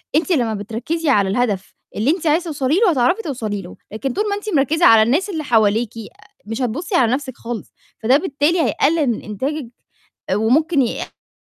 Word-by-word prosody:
أنتِ 335 +4 +1
لمّا 240 -8 +1
بتركّزي 240 +10 -3
على 200 -7 +3
الهدف 200 -4 -1 0.2
اللي 225 +7 0
أنتِ 335 -2 -2
عايزة 330 +4 +2
توصلي 290 -2 -1
له، 445 -5 +4
هتعرفي 285 - +2
توصلي 220 - -4
له، 175 - -11 0.2
لكن 245 +4 -3
طول 420 - 0
ما 405 - 0
أنتِ 415 +1 -6
مركِّزة 315 +5 +2
على 220 -1 +7
الناس 305 - +1
اللي 320 -5 -3
حواليكِ 225 -2 +1
آآ، 220 - -11 0.2
مش 225 +4 -4
هتبُصي 300 - -2
على 240 -5 +3
نَفْسِك 260 -2 -4
خالص، 230 -2 -7 0.3
فده 255 +5 +5
بالتالي 310 +1 0
هيقلل 310 -1 +1
من 235 - -1
إنتاجِك 260 +6 -4 0.6
آآ، - - +2
وممكن 275 +7 +2
يأدي 235 - -5
260 Hz, 190 wpm, -19 LUFS, 225-315 Hz, 0.6 s, على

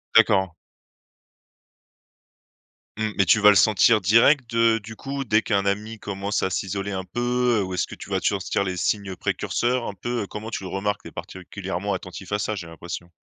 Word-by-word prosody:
D'accord. 95 -2 +5 2.5
Mmh. 110 0 -1
Mais 100 - +4
tu 110 - +5
vas 105 0 +7
le 105 - +6
sentir 110 +2 +5
direct 115 +6 +4
de 115 0 +4
du 110 +1 -10
coup 135 +3 -4
dès 110 -2 +3
qu'un 100 -3 0
ami 105 +3 -2
commence 100 +1 -3
à 95 - +1
s'isoler 100 +3 -3
un 95 -1 -3
peu, 120 +2 0
heu, - - 0
ou 95 0 -5
est-ce - - 0
que - - -9
tu - - -11
vas - - 0
te - - 0
sentir 100 - 0
les 95 -2 -3
signes 100 +1 -1
précurseurs 120 +6 -1
un - - -4
peu? 115 +3 -3
Comment 110 +2 -7
tu 95 - -5
le 95 - -5
remarques? 100 +2 -2
Tu - - -9
es - - -19
particulièrement - - -5
attentif - - -7
à 105 - 0
ça 105 +1 -2
j'ai 85 -4 -7
l'impression. 85 +1 -8
105 Hz, 200 wpm, -24 LUFS, 95-115 Hz, 2.5 s, vas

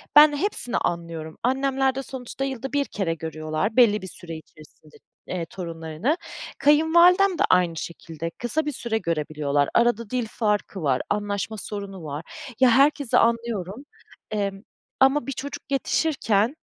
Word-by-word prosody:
Ben 295 0 +9
hepsini 285 -9 -1
anlıyorum. 165 -2 -3
Annemler 265 +1 +1
de 270 - -3
sonuçta 260 0 -6
yılda 270 0 -5
1 285 -1 +2
kere 190 -5 -2
görüyorlar 155 +4 -3
belli 220 -4 +5
bir 190 - -7
süre 165 -2 -7
içerisinde, 155 -1 -17 0.3
eee, 175 -2 -3
torunlarını. 165 - -3 0.4
Kayınvalidem 340 +6 +5
de - - +2
aynı 180 -2 +3
şekilde 165 0 -6
kısa 240 - -2
bir 295 - -1
süre 235 -2 -2
görebiliyorlar. 150 -5 0
Arada 235 -2 +2
dil 250 -3 -1
farkı 210 -3 -1
var, 130 -3 +2
anlaşma 205 0 -2
sorunu 200 -3 -5
var. 150 +2 -6 0.3
Ya 255 - +6
herkesi 275 +1 +4
anlıyorum. 230 0 0 0.5
Emm, 200 -2 -2 0.4
ama 270 0 +4
bir - - -2
çocuk 280 +2 -6
yetişirken, 265 -5 +1
215 Hz, 140 wpm, -24 LUFS, 170-270 Hz, 0.5 s, Ben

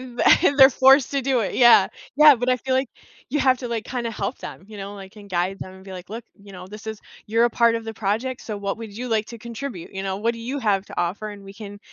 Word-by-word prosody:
Mm, 245 -2 -11 0.2
th 285 - +3
they're 265 0 +10
forced 265 +2 +5
to 275 -1 0
do 260 -2 +1
it, 200 - -3
yeah, 240 -6 +6 0.3
yeah, 300 -1 +8
but 245 +1 -3
I 255 - +3
feel 260 +1 -2
like 260 -1 0 0.4
you 295 0 0
have 260 -1 +3
to 245 - -6
like 230 -2 -3
kinda 240 -3 -3
help 230 +3 -4
them, - - -9
you 215 - -11
know, 200 +1 -7
like 195 +1 -12
and 205 -1 -13
guide 180 +2 -1
them 185 - -8
and 190 0 -15
be 190 - -10
like, 180 +1 -10
"Look," 230 +2 -6 0.2
you 200 0 -15
know, 180 0 -10
"This 210 +2 -11
is 220 -1 -6 0.3
you're 230 +2 +2
a - - -2
part 235 0 +3
of 230 - -5
the 225 0 -6
project, 225 +5 -2
so 215 -2 -5
what 200 0 -3
would 220 -3 -9
you 250 +1 -5
like 220 -1 0
to 235 - -10
contribute?" 235 -4 -8
You 195 - -4
know, 195 0 -3
"What 230 +2 0
do - - -10
you 260 +5 -4
have 205 -5 0
to - - -4
offer, 205 +5 -3
and 200 -1 -11
we 195 0 -12
can, 205 -1 -10
225 Hz, 290 wpm, -22 LUFS, 200-250 Hz, 0.4 s, they're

